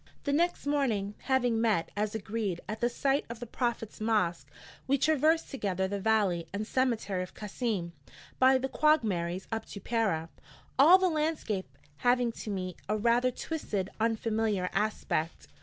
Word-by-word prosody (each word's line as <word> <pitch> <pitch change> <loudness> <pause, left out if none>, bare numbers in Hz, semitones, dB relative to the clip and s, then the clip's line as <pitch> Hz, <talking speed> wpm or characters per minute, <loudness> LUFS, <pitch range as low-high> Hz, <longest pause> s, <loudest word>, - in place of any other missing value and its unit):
The 285 - 0
next 345 +2 +1
morning, 240 -9 0
having 245 -4 +2
met, 215 -8 +1
as 210 +1 -1
agreed, 205 -4 -2
at 215 +1 -4
the 240 - +3
site 275 +3 +1
of 235 -1 -7
the 240 - -5
Prophet's 235 -2 -3
mosque, 180 -10 0 0.4
we 275 +1 +3
traversed 315 +3 +2
together 190 -7 -1
the 200 +1 -3
valley 195 -5 +1
and 205 +2 -3
cemetery 230 -7 0
of 180 - -7
Kassim 210 -4 -3 0.5
by 260 +1 +6
the 260 +1 -2
quagmires 205 - +1
up 225 0 -2
to 200 - -8
Pera, 195 -7 0 0.5
all 330 +7 +9
the 375 0 +2
landscape 300 - -2 0.2
having 245 - +2
to 225 - -8
me 185 -3 -3
a 215 - +1
rather 235 +3 +3
twisted 235 - -3
unfamiliar 220 -4 0
aspect. 190 -6 -1
225 Hz, 155 wpm, -30 LUFS, 195-260 Hz, 0.5 s, all